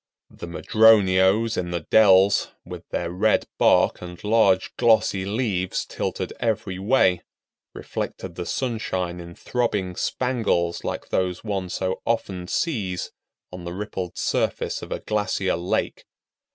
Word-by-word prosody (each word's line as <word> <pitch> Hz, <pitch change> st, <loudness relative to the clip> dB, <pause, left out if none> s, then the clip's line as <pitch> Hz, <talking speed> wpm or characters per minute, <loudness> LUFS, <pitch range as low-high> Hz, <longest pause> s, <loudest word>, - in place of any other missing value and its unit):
The -, -, -9 dB
madroños 105 Hz, +2 st, +4 dB
in 90 Hz, -1 st, -3 dB
the 85 Hz, -1 st, -2 dB
dells, 100 Hz, +1 st, +5 dB, 0.2 s
with -, -, -10 dB
their 85 Hz, -, -3 dB
red 105 Hz, +5 st, +2 dB
bark -, -, +4 dB
and 90 Hz, 0 st, -8 dB
large 105 Hz, -3 st, +2 dB
glossy 110 Hz, -5 st, +3 dB
leaves 100 Hz, -4 st, -1 dB
tilted -, -, -4 dB
every 100 Hz, -5 st, -2 dB
way, 95 Hz, -4 st, +3 dB, 0.5 s
reflected 95 Hz, -, -5 dB
the 90 Hz, 0 st, -6 dB
sunshine 95 Hz, -8 st, -2 dB
in 85 Hz, 0 st, -10 dB
throbbing 105 Hz, -7 st, -2 dB
spangles 110 Hz, -11 st, -1 dB
like -, -, -4 dB
those 90 Hz, -1 st, -1 dB
one 100 Hz, -4 st, -3 dB
so 95 Hz, +1 st, -2 dB
often 95 Hz, -6 st, -2 dB
sees 100 Hz, -, -2 dB, 0.4 s
on 90 Hz, -1 st, -8 dB
the 85 Hz, 0 st, -5 dB
rippled 95 Hz, -2 st, -5 dB
surface -, -, -1 dB
of -, -, -9 dB
a -, -, -3 dB
glacier 105 Hz, -3 st, -1 dB
lake. 85 Hz, +2 st, -2 dB
95 Hz, 130 wpm, -24 LUFS, 90-110 Hz, 0.5 s, dells